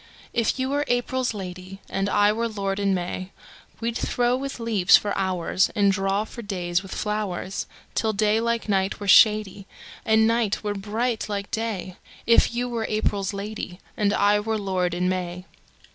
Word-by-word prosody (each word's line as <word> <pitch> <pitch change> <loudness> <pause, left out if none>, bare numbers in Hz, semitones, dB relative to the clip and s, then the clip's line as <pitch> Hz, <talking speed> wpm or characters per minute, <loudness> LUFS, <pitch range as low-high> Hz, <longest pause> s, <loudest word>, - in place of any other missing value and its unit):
If 230 +1 +1
you 260 0 -1
were 290 +1 +1
April's 245 +1 0
lady, 185 -1 -7
And 195 +1 -1
I 205 +1 +4
were 230 +2 -1
lord 200 -3 -3
in 200 -1 +2
May, 185 +1 -4 0.5
We'd 230 0 -2
throw 245 +1 +1
with 275 0 -5
leaves 220 -6 +5
for 205 - -3
hoursAnd 190 +1 +1
draw 195 +1 0
for 235 - -9
days 180 -4 -1
with 195 -1 -11
flowers, 205 -3 -3 0.3
Till 220 - +1
day 215 +1 +2
like 235 -1 -1
night 195 -1 0
were 205 - -6
shadyAnd 205 -1 +5 0.6
night 230 -2 +1
were 205 -1 -1
bright 220 +4 -2
like 200 -1 -4
day; 210 -5 -3 0.3
If 230 - +5
you 245 +1 -2
were 230 -2 -2
April's 205 -2 0
lady, 200 -2 -6 0.2
And 205 -2 +1
I 205 0 +3
were 220 +1 -1
lord 185 -4 -1
in 180 +1 0
May. 180 -1 -3
205 Hz, 165 wpm, -24 LUFS, 190-225 Hz, 0.6 s, leaves